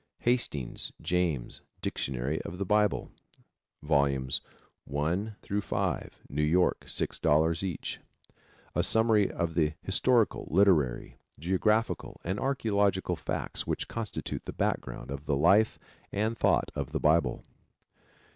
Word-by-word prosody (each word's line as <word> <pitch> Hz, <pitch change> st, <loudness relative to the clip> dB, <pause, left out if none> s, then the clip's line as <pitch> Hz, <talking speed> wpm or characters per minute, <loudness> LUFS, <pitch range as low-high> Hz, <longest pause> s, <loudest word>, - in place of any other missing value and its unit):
Hastings, 120 Hz, -, -1 dB
James, 85 Hz, -7 st, -1 dB, 0.2 s
Dictionary 65 Hz, +4 st, -2 dB
of 85 Hz, -, -7 dB
the 100 Hz, -, -2 dB
Bible, 105 Hz, +1 st, +1 dB, 0.7 s
Vols. 70 Hz, -3 st, +2 dB, 0.4 s
1 85 Hz, +10 st, -1 dB, 0.3 s
5. -, -, -2 dB
New 75 Hz, +2 st, -2 dB
York, 85 Hz, +4 st, +3 dB
$6.00 80 Hz, +2 st, +1 dB
each. 95 Hz, -4 st, -4 dB, 0.7 s
A -, -, +2 dB
summary 110 Hz, -3 st, +4 dB
of 85 Hz, -1 st, -2 dB
the 80 Hz, -2 st, +2 dB
historical, 115 Hz, +4 st, +2 dB
literary, 80 Hz, -9 st, +2 dB, 0.2 s
geographical 100 Hz, +7 st, 0 dB
and 95 Hz, +4 st, -2 dB
archaeological 100 Hz, -8 st, +1 dB
facts 75 Hz, -, -3 dB
which -, -, -2 dB
constitute 115 Hz, -3 st, -4 dB
the -, -, -5 dB
background 65 Hz, -, -2 dB
of 70 Hz, +2 st, -6 dB
the 70 Hz, -, +2 dB
life 100 Hz, +9 st, +4 dB, 0.3 s
and 110 Hz, +3 st, 0 dB
thought -, -, +2 dB
of -, -, -4 dB
the -, -, 0 dB
Bible. 75 Hz, -5 st, +2 dB
90 Hz, 115 wpm, -29 LUFS, 75-105 Hz, 0.7 s, summary